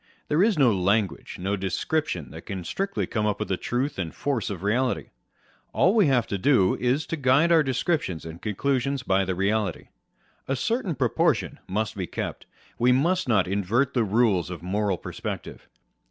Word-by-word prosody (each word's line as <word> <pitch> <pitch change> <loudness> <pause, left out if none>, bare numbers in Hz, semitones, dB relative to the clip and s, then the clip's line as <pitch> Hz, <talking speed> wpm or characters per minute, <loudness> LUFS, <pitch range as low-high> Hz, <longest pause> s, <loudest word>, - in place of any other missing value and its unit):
There 150 +4 +3
is 210 -2 +3
no 130 -6 +5
language, 100 +1 0
no 95 +3 -1
descrip 125 - -1
tion 85 - -5
that - - -11
can 95 -2 -4
strictly 195 - -2
come 110 -2 -1
up 105 - 0
to - - -2
the 95 - -1
truth 125 +6 -2
and 85 -3 -2
force 135 -7 -1
of 95 -3 -6
reality: 125 +5 0 0.6
all 185 - +4
we 215 -7 +4
have 125 -4 +3
to 100 - -3
do 95 -5 +4
is 130 +5 0
to - - -3
guide 140 +4 +3
our 165 -1 +6
descriptions 130 - -1
and 80 +1 -9
conclusions 135 +5 -1
by 95 -3 +2
the 95 0 -2
reality. 100 0 -1 0.6
A 135 - 0
certain 205 - -1
proportion 125 -3 +1
must 110 +3 -2
be 95 -3 -3
kept: - - -5 0.3
we 125 +1 +4
must 165 +4 +2
not 100 -6 +3
invert 105 +8 +1
the 120 - +2
rules 105 -4 +2
of 90 -2 -7
moral 100 +1 0
perspective. - - -7
115 Hz, 185 wpm, -25 LUFS, 95-140 Hz, 0.6 s, our